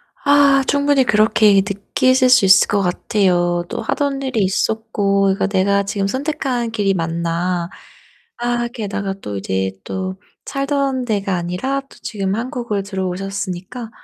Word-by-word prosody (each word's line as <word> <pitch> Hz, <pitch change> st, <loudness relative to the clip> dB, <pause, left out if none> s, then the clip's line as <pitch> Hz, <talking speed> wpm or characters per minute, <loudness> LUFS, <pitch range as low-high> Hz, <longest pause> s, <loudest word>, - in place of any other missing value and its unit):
아 285 Hz, -1 st, +4 dB
충분히 285 Hz, -1 st, +3 dB
그렇게 215 Hz, -2 st, +4 dB
느끼실 255 Hz, +6 st, +2 dB
수 250 Hz, -, +6 dB
있을 190 Hz, 0 st, +6 dB
것 205 Hz, -1 st, +1 dB
같아요. 175 Hz, -2 st, +1 dB
또 -, -, -4 dB
하던 280 Hz, -2 st, -1 dB
일이 260 Hz, -5 st, -1 dB
있었고 200 Hz, 0 st, 0 dB
그러니까 195 Hz, 0 st, +1 dB
'내가 200 Hz, 0 st, +2 dB
지금 200 Hz, 0 st, -2 dB
선택한 260 Hz, -2 st, -2 dB
길이 205 Hz, -3 st, +1 dB
맞나?' 170 Hz, +1 st, -2 dB, 0.7 s
아 240 Hz, 0 st, -1 dB
게다가 200 Hz, -4 st, -3 dB
또 100 Hz, -1 st, -5 dB
이제 95 Hz, 0 st, -2 dB
또 190 Hz, 0 st, -4 dB, 0.3 s
살던 275 Hz, -2 st, -1 dB
데가 200 Hz, -4 st, -1 dB
아니라 180 Hz, +11 st, -2 dB
또 275 Hz, -, -20 dB
지금 195 Hz, -2 st, -2 dB
한국을 235 Hz, -4 st, -3 dB
들어오셨으니까 195 Hz, +3 st, -4 dB
200 Hz, 290 characters per minute, -19 LUFS, 190-255 Hz, 0.7 s, 수